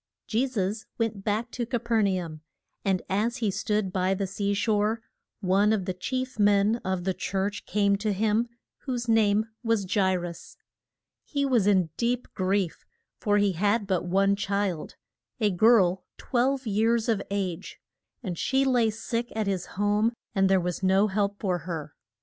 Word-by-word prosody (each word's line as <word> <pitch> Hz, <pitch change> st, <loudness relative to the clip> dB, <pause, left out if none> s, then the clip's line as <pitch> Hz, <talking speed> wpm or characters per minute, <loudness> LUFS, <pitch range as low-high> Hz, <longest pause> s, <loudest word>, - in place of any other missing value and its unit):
JE 240 Hz, +4 st, +1 dB
SUS 215 Hz, -3 st, -2 dB
went 220 Hz, -4 st, -2 dB
back 220 Hz, +3 st, -1 dB
to 245 Hz, -, -3 dB
Ca 240 Hz, +1 st, -1 dB
per 230 Hz, -1 st, +1 dB
na 190 Hz, -3 st, +1 dB
um. 155 Hz, -2 st, -9 dB, 0.4 s
And 190 Hz, -2 st, +1 dB
as 220 Hz, +6 st, 0 dB
he 220 Hz, -5 st, 0 dB
stood 210 Hz, -1 st, -1 dB
by 185 Hz, +1 st, +1 dB
the 195 Hz, +1 st, -1 dB
sea 200 Hz, +1 st, -1 dB
shore, 215 Hz, +1 st, +1 dB, 0.4 s
one 200 Hz, +2 st, +3 dB
of 205 Hz, -4 st, 0 dB
the 185 Hz, -, -2 dB
chief 255 Hz, +6 st, -4 dB
men 205 Hz, +2 st, +4 dB
of 190 Hz, -1 st, -2 dB
the 190 Hz, +1 st, 0 dB
church 195 Hz, +2 st, -3 dB
came 200 Hz, -1 st, +2 dB
to 210 Hz, +1 st, -1 dB
him, 215 Hz, +3 st, +1 dB, 0.3 s
whose 245 Hz, -3 st, -4 dB
name 215 Hz, -1 st, +3 dB, 0.2 s
was 215 Hz, -4 st, 0 dB
Ja 200 Hz, -2 st, +4 dB
i 190 Hz, -, +2 dB
rus. 175 Hz, -1 st, -7 dB, 0.7 s
He 280 Hz, -2 st, -1 dB
was 240 Hz, -7 st, +2 dB
in 185 Hz, -6 st, +3 dB
deep 245 Hz, +1 st, 0 dB
grief, 185 Hz, -2 st, -1 dB, 0.4 s
for 205 Hz, -1 st, +2 dB
he 205 Hz, -1 st, +3 dB
had 205 Hz, +5 st, +1 dB
but 190 Hz, -3 st, 0 dB
one 195 Hz, +3 st, +2 dB
child, 200 Hz, -4 st, -2 dB, 0.4 s
a 210 Hz, -3 st, +2 dB
girl 190 Hz, -2 st, +4 dB
twelve 260 Hz, +2 st, 0 dB
years 225 Hz, +2 st, +1 dB
of 220 Hz, -4 st, +1 dB
age, 190 Hz, -4 st, -3 dB, 0.5 s
and 180 Hz, -6 st, -4 dB
she 270 Hz, +1 st, +2 dB
lay 245 Hz, -4 st, +3 dB
sick 230 Hz, +2 st, -3 dB
at 220 Hz, -1 st, 0 dB
his 190 Hz, -3 st, -2 dB
home 205 Hz, +3 st, +2 dB, 0.2 s
and 195 Hz, -2 st, +3 dB
there 190 Hz, -1 st, +4 dB
was 180 Hz, 0 st, -3 dB
no 190 Hz, +2 st, +3 dB
help 200 Hz, 0 st, -1 dB
for 185 Hz, -4 st, 0 dB
her. 155 Hz, -4 st, -6 dB
205 Hz, 175 wpm, -27 LUFS, 190-225 Hz, 0.7 s, men